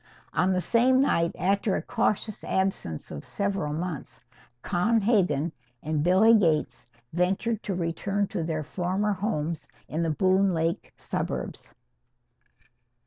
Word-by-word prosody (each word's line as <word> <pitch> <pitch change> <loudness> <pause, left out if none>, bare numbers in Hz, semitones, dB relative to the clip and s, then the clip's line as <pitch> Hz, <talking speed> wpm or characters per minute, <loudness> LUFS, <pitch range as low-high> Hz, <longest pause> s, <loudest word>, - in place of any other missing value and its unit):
On 185 - +2
the 185 -1 +1
same 250 +6 +3
night 170 -11 +2
after 195 +3 +1
a - - -1
cautious 215 0 -1
absence 190 - -2
of 70 - -6
several 200 -7 -2
months 160 -1 -5 0.4
Con 215 +6 +2
Hegan 185 - +2 0.3
and 155 0 0
Billy 190 +7 +5
Gates 165 -8 +2 0.3
ventured 195 +6 0
to 195 - -3
return 190 +4 -1
to - - -3
their 160 -1 -2
former 190 +6 -1
homes 165 -7 -2 0.2
in 160 - -2
the 165 - +1
Boone 190 +3 +3
Lake 165 +1 -1
suburbs. - - -4
185 Hz, 130 wpm, -27 LUFS, 165-200 Hz, 0.4 s, Billy